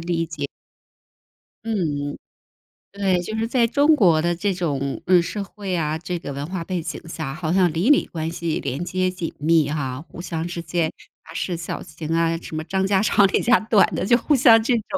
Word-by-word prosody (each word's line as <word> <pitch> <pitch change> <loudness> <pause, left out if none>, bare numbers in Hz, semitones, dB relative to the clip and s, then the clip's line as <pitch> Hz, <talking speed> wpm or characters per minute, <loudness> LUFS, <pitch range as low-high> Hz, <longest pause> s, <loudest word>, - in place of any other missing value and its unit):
理 165 0 -1
解。 155 -3 -4 1.2
嗯， 150 -10 -2 0.8
对， 195 -3 +1
就 220 +5 -5
是 225 +1 0
在 240 0 +2
中 290 +6 +4
国 175 - +4
的 175 +1 0
这 195 +3 -1
种， 140 -6 -2
嗯， 180 -1 +5
社 200 +4 -4
会 195 -1 -5
啊， 155 -2 -1
这 175 +1 -4
个 140 - -6
文 140 +1 -4
化 175 +1 -4
背 180 0 -3
景 160 -1 -6
下， 155 -4 -5
好 155 +2 -3
像 185 -3 +3
邻 175 - +2
里 295 - +4
关 160 -1 -4
系 165 -1 -2
连 140 +4 -3
接 185 +1 0
紧 180 -3 -5
密 155 -1 +3
哈， 135 -3 -3
互 170 - -10
相 165 -2 -4
之 175 -1 -5
间 165 -1 -1 0.3
杂 - - -12
事 180 - -2
小 170 0 -5
情 155 0 -8
啊， 165 0 +2
什 165 - -8
么 155 - -3
张 190 +2 0
家 195 -1 +2
长 205 -1 +4
李 - - +1
家 245 0 +4
短 215 -2 +4
的， - - -1
就 240 +3 +5
互 290 +5 +2
相 230 -3 +6
这 245 +3 +1
种。 225 - -1
175 Hz, 230 characters per minute, -22 LUFS, 160-195 Hz, 1.2 s, 相